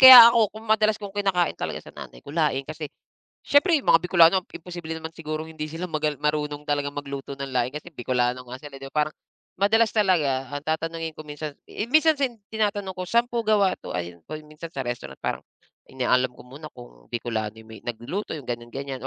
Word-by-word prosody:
kaya 250 -3 +13
ako 230 -3 +4
kung 220 - -9
madalas 215 -1 +3
kong 205 -2 -8
kinakain 195 -4 +1
talaga - - -5
sa - - -12
nanay - - -11
ko 140 - -9
laing 150 -4 +1
kasi 155 +1 -6 0.5
siyempre 285 +6 +4
yung - - -13
mga 165 +1 +6
Bikolano 180 +1 +5
imposible 175 -1 -7
naman 160 0 -6
sigurong 155 -1 -4
hindi 160 -1 -6
sila 170 +3 -4
magal 155 -3 -1
marunong 150 0 -1
talagang 145 -1 0
magluto 140 -1 -6
ng 140 - -3
laing 125 0 +2
kasi 150 +4 -7
Bikolano 125 -4 -1
nga 125 +1 -9
sila, 145 0 -10
'di 135 0 -9
ba? 150 0 +2
Parang 155 - -11 0.4
madalas 220 +4 +3
talaga 150 -11 +2
ang 145 - -3
tatanungin 160 +1 -3
ko 155 - -8
minsan, 150 0 -6 0.2
i 210 - -3
minsan 310 +2 +4
sin 260 -4 0 0.2
tinatanong 205 -3 0
ko, 180 - -3
sa'n 235 +4 +2
po 235 -2 -2
gawa 205 -3 +3
'to? - - -6
Ayun 85 -1 -4
kung 155 - -5
yung 150 - -17
minsan 155 +2 -8
sa 135 - -2
restaurant 120 -1 -5
parang - - -1 0.5
inaalam 125 -1 +1
ko - - -13
muna 140 +5 -10
kung - - -14
Bikolano 110 -2 -3
yung 110 0 -14
may 110 - -9
nagluluto 120 - -4
yung 150 - -7
ganyan, 120 -1 -4
ganyan 135 -1 -4
155 Hz, 210 wpm, -25 LUFS, 135-190 Hz, 0.5 s, kaya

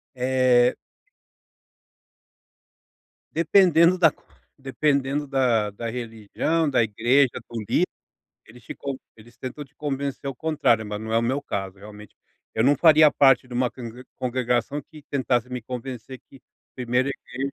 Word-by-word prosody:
É. 125 -1 +3 2.6
Dependendo 170 +1 +4
da 165 -4 +5 0.5
dependendo 140 +1 0
da 120 -6 +1
da 115 +3 -5
religião, 120 +7 -2
da 130 -4 +3
igreja, 120 +5 +2 0.2
do 115 -1 -5
lider, - - +2 0.6
eles 120 +1 -17
ficam 140 -2 -6 0.2
eles 115 +2 -18
tentam 130 +3 -7
te 140 +1 -26
convencer 140 -1 -4
ao 135 - -3
contrário, 150 -8 +1
mas 105 0 -5
não 110 0 -5
é 115 - +4
o - - 0
meu 130 +4 0
caso 95 -7 -5
realmente. 105 0 -13 0.4
Eu 110 - +1
não 145 +3 +5
faria 155 +1 +7
parte 135 -2 +4
de 125 - -10
uma 125 0 +1
congre 125 0 -10
congregação 125 +2 -1
que 155 +1 -15
tentasse 125 -3 0
me 125 -1 -5
convencer 125 +1 -7
que 135 - -17 0.3
primeiro 125 +1 0
a - - -1 0.2
igreja, 135 +3 -3
130 Hz, 145 wpm, -24 LUFS, 115-140 Hz, 2.6 s, faria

